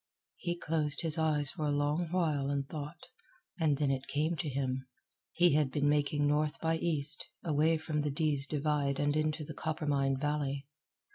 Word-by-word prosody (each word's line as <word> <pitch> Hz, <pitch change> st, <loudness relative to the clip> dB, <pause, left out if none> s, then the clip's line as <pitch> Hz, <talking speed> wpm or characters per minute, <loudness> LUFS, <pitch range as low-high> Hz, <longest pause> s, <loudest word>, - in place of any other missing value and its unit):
He 175 Hz, -1 st, -3 dB
closed 150 Hz, -2 st, -1 dB
his 160 Hz, -1 st, -1 dB
eyes 150 Hz, -3 st, +6 dB
for 150 Hz, -, -3 dB
a -, -, 0 dB
long 145 Hz, +4 st, 0 dB
while 155 Hz, -6 st, 0 dB
and 140 Hz, -1 st, -2 dB
thought, 150 Hz, +2 st, -7 dB, 0.5 s
and 155 Hz, -4 st, +2 dB
then 145 Hz, -1 st, +1 dB
it 135 Hz, 0 st, -3 dB
came 150 Hz, +5 st, -1 dB
to 155 Hz, -, -3 dB
him. 130 Hz, -1 st, -3 dB, 0.4 s
He 175 Hz, -3 st, +3 dB
had 150 Hz, -2 st, +2 dB
been 145 Hz, +2 st, 0 dB
making 145 Hz, 0 st, +1 dB
north 150 Hz, +1 st, 0 dB
by 165 Hz, 0 st, 0 dB
east, 155 Hz, -3 st, +3 dB, 0.2 s
away 160 Hz, 0 st, +2 dB
from 155 Hz, -1 st, -2 dB
the 150 Hz, -, -1 dB
Dease 145 Hz, -1 st, +1 dB
Divide 145 Hz, -2 st, -1 dB
and 145 Hz, 0 st, +1 dB
into 155 Hz, 0 st, -1 dB
the 155 Hz, -, -8 dB
Coppermine 145 Hz, -3 st, -1 dB
Valley. 145 Hz, -1 st, -2 dB
150 Hz, 180 wpm, -31 LUFS, 140-155 Hz, 0.5 s, eyes